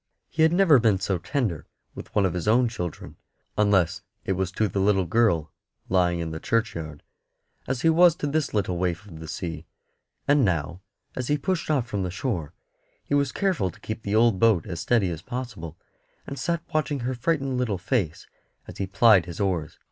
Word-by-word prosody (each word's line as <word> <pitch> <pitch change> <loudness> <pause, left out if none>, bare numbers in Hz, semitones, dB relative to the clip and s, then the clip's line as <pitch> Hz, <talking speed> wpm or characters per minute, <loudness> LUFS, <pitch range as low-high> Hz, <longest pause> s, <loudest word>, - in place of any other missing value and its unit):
He 160 - -2
had 160 0 +6
never 175 -6 +5
been 110 -5 +3
so 95 -1 -1
tender 110 - -2 0.3
with - - -10
one 100 - +4
of 90 - 0
his 90 +2 -3
own 120 +3 +4
children 90 -8 -6 0.4
unless 100 -6 +2 0.2
it - - -1
was 95 -1 -1
to 110 +2 +1
the 100 +1 -2
little 95 -1 +3
girl 85 -6 +2 0.4
lying 90 -2 +2
in 80 -1 -3
the 80 - -5
churchyard 85 -10 -2 0.6
as 130 -1 -2
he 165 - +5
was 170 0 +6
to 150 - -4
this 145 0 0
little 95 -4 -1
waif 90 +2 -1
of 85 -6 -11
the 80 - -8
sea; 80 0 -5 0.6
and 145 -1 +4
now, 85 -2 -1 0.3
as 130 -1 -3
he 150 - +2
pushed 170 +3 -2
off 140 -6 +2
from 105 -5 -3
the 90 - -2
shore, 90 - -3 0.5
he - - -4
was 140 -2 +2
careful 185 - 0
to - - -14
keep 110 +1 -5
the 100 0 -2
old 115 -3 +4
boat 110 -8 +4
as 85 -4 -5
steady 105 -5 +2
as 80 -2 -5
possible, 105 - -6 0.5
and 140 - -6
sat 170 -1 -1
watching 150 -3 0
her 120 - -2
little 120 - -11 0.6
frightened - - -16
face 95 - -1 0.4
as - - -10
he 95 - -1
plied 100 -2 +5
his 85 +1 -7
oars. 90 -6 -1
100 Hz, 200 wpm, -25 LUFS, 85-125 Hz, 0.6 s, had